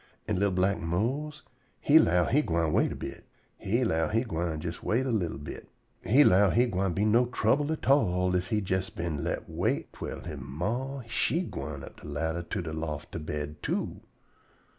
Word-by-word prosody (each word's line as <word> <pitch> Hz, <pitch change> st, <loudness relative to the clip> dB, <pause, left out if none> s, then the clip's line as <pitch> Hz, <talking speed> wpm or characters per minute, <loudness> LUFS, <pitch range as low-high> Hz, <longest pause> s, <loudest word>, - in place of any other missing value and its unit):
An' 105 Hz, -4 st, 0 dB
li'l 100 Hz, 0 st, +3 dB
black 95 Hz, +1 st, +1 dB
Mose 130 Hz, -, -2 dB, 0.4 s
he 155 Hz, +2 st, +6 dB
'low 90 Hz, -, +4 dB
he 145 Hz, -, +3 dB
gwine 80 Hz, -, 0 dB
wait -, -, +3 dB
a -, -, -4 dB
bit. -, -, -7 dB, 0.4 s
He 115 Hz, +6 st, +1 dB
'low 80 Hz, -6 st, +1 dB
he 115 Hz, +6 st, +1 dB
gwine 85 Hz, -7 st, -2 dB
jes 85 Hz, +1 st, -5 dB
wait 125 Hz, +4 st, +1 dB
a 130 Hz, -, 0 dB
li'l 95 Hz, -8 st, -1 dB
bit. 75 Hz, -, -8 dB, 0.3 s
He 135 Hz, +7 st, +6 dB
'low 100 Hz, -4 st, +5 dB
he 120 Hz, +5 st, +4 dB
gwine 95 Hz, -5 st, 0 dB
be 100 Hz, +4 st, +1 dB
no 115 Hz, +3 st, +4 dB
trouble 130 Hz, +5 st, +1 dB
at 160 Hz, -, -4 dB
all 90 Hz, -9 st, +3 dB
ef 90 Hz, 0 st, 0 dB
he 105 Hz, +1 st, 0 dB
jes 95 Hz, 0 st, 0 dB
been 85 Hz, -4 st, -3 dB
let -, -, -3 dB
wait -, -, -1 dB
twell -, -, -6 dB
he 85 Hz, -, -6 dB
ma 110 Hz, -, -3 dB
she 150 Hz, +8 st, +1 dB
gwine 70 Hz, -, -6 dB
up -, -, -11 dB
de -, -, -10 dB
ladder 80 Hz, +3 st, -2 dB
to 85 Hz, +2 st, -4 dB
de 80 Hz, -2 st, -5 dB
loft 75 Hz, -2 st, -4 dB
to -, -, -4 dB
bed, 75 Hz, -1 st, -5 dB
too. -, -, -2 dB
95 Hz, 200 wpm, -29 LUFS, 80-120 Hz, 0.4 s, he